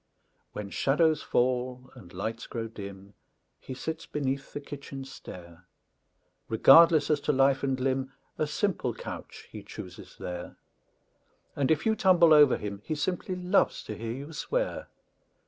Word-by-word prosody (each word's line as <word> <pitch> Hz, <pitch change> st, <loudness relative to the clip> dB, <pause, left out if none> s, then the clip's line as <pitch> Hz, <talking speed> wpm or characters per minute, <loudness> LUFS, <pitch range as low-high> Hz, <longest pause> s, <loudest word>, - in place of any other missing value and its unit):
When 100 Hz, -2 st, -6 dB
shadows 155 Hz, +2 st, +2 dB
fall 125 Hz, 0 st, -1 dB
and 85 Hz, -3 st, -14 dB
lights 110 Hz, +6 st, -5 dB
grow 115 Hz, -1 st, -4 dB
dim 100 Hz, -2 st, -10 dB, 0.5 s
He 130 Hz, -, -8 dB
sits 160 Hz, +4 st, -5 dB
beneath 140 Hz, -1 st, -3 dB
the -, -, -5 dB
kitchen 140 Hz, -1 st, -8 dB
stair; 90 Hz, -9 st, -12 dB, 0.8 s
Regardless 155 Hz, +6 st, +7 dB
as 150 Hz, -, +2 dB
to 150 Hz, -, 0 dB
life 135 Hz, -1 st, +3 dB
and 135 Hz, -2 st, -1 dB
limb, 130 Hz, 0 st, -1 dB, 0.3 s
A 155 Hz, -, +1 dB
simple 150 Hz, -, -1 dB
couch -, -, -8 dB
he -, -, -8 dB
chooses -, -, -10 dB
there; 90 Hz, -1 st, -6 dB, 1.0 s
And 140 Hz, -2 st, 0 dB
if 160 Hz, -1 st, +2 dB
you 220 Hz, 0 st, +3 dB
tumble 175 Hz, -5 st, +5 dB
over 145 Hz, -3 st, +7 dB
him, 100 Hz, -1 st, -6 dB
He 155 Hz, -, -3 dB
simply 180 Hz, +4 st, -2 dB
loves 180 Hz, +2 st, +1 dB
to 110 Hz, -, -6 dB
hear 115 Hz, +2 st, -5 dB
you 140 Hz, +5 st, -8 dB
swear. -, -, -2 dB
135 Hz, 145 wpm, -28 LUFS, 115-155 Hz, 1.0 s, Regardless